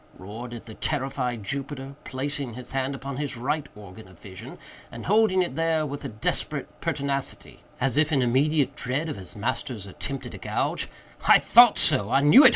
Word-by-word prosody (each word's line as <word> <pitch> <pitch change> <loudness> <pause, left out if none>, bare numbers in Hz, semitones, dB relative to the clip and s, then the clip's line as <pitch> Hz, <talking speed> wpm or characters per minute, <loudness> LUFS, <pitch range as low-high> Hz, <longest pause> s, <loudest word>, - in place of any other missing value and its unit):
roared 110 +6 -8 0.2
the 110 - -10
terrified 130 -4 -2
Jupiter, 135 +3 -4
placing 135 -2 -4
his 125 0 -8
hand 135 +1 -2
upon 135 0 -6
his 145 -4 -4
right 145 +4 -2
organ 105 0 -12
of 95 -2 -17
vision, 95 -1 -10 0.3
and - - -8
holding 205 -2 +3
it 175 - -5
there 165 -1 0
with 145 0 -6
a - - -3
desperate 110 -3 -3
pertinacity, 140 -1 -2 0.2
as 135 +1 +1
if 155 +1 +3
in 135 -4 +2
immediate 140 +2 +1
dread 135 +6 -2
of - - -4
his 95 -3 -9
master's 105 +1 -3
attempt 135 +7 -6
at - - -8
a - - -9
gouge. - - -2 0.4
"I - - +9
thought - - +6
so!—I 110 +7 +6
knew 150 - +8
it! 260 - +10
135 Hz, 180 wpm, -25 LUFS, 120-145 Hz, 0.4 s, it